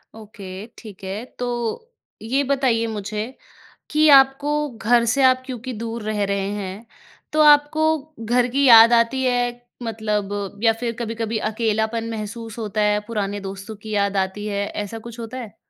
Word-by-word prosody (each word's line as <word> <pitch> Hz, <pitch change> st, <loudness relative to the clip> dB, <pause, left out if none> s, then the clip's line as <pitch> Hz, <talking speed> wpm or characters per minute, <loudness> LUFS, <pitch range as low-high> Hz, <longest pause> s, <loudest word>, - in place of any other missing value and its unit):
Okay, 205 Hz, -3 st, -9 dB
ठीक 205 Hz, -5 st, -12 dB
है। 195 Hz, +4 st, -4 dB, 0.2 s
तो 245 Hz, -, -3 dB, 0.3 s
ये 260 Hz, +6 st, 0 dB
बताइए 260 Hz, -4 st, +1 dB
मुझे 210 Hz, 0 st, -4 dB, 0.6 s
कि 310 Hz, +1 st, +3 dB
आपको 270 Hz, +1 st, +5 dB, 0.2 s
घर 235 Hz, 0 st, +2 dB
से 275 Hz, -, +2 dB
आप 255 Hz, 0 st, +4 dB
क्योंकि 255 Hz, -1 st, -6 dB
दूर 230 Hz, 0 st, -5 dB
रह 210 Hz, -1 st, -1 dB
रहे 200 Hz, 0 st, -1 dB
हैं, 200 Hz, +2 st, -6 dB, 0.5 s
तो 310 Hz, -, +3 dB
आपको 305 Hz, +1 st, +5 dB, 0.3 s
घर 245 Hz, +2 st, +2 dB
की 280 Hz, +2 st, +2 dB
याद 230 Hz, 0 st, +9 dB
आती 235 Hz, +3 st, +2 dB
है? 245 Hz, -1 st, 0 dB, 0.2 s
मतलब 205 Hz, -3 st, -3 dB
या 225 Hz, -1 st, +5 dB
फिर 230 Hz, +1 st, -3 dB
कभी-कभी 225 Hz, -1 st, -3 dB
अकेलापन 220 Hz, +1 st, -1 dB
महसूस 225 Hz, +1 st, -6 dB
होता 215 Hz, -1 st, -2 dB
है, 210 Hz, 0 st, +2 dB
पुराने 205 Hz, -3 st, -2 dB
दोस्तों 195 Hz, +2 st, -7 dB
की 215 Hz, +1 st, -12 dB
याद 200 Hz, -1 st, +1 dB
आती 190 Hz, +2 st, -2 dB
है, 200 Hz, -1 st, -2 dB
ऐसा 210 Hz, +2 st, -5 dB
कुछ 235 Hz, +1 st, -10 dB
होता 230 Hz, +2 st, -6 dB
है? 230 Hz, -5 st, -8 dB
225 Hz, 160 wpm, -22 LUFS, 210-245 Hz, 0.6 s, याद